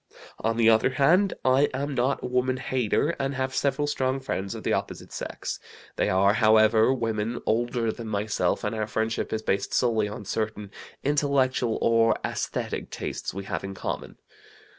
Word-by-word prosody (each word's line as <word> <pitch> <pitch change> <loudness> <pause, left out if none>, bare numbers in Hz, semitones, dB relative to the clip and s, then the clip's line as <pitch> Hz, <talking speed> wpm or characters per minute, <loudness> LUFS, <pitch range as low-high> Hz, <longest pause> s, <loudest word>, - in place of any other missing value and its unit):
On 115 0 0
the 115 -1 +4
other 110 +2 +5
hand, 165 +9 +3
I 130 +3 +4
am 140 +2 -2
not 130 +2 0
a - - -2
woman 125 +1 +1
hater, 130 +2 0
and 135 0 -1
have 130 0 -2
several 145 +2 +1
strong 135 -2 0
friends 100 -7 -3
of - - -7
the - - +1
opposite - - -4
sex. - - -5 0.4
They - - +1
are, 100 +2 +4
however, 110 +1 +5
women 115 -2 -1
older 115 0 0
than 115 0 -8
myself, 105 0 0
and - - -1
our 110 -1 -2
friendship 110 +1 -2
is 110 0 -2
based 100 -1 -1
solely 110 -4 +2
on 105 0 -7
certain 105 -1 -3 0.3
intellectual 135 -5 +1
or 115 -1 +4
esthetic - - -3
tastes - - -4
we 100 +1 -6
have 95 - -4
in 95 0 -6
common. - - -5
115 Hz, 170 wpm, -26 LUFS, 110-130 Hz, 0.4 s, other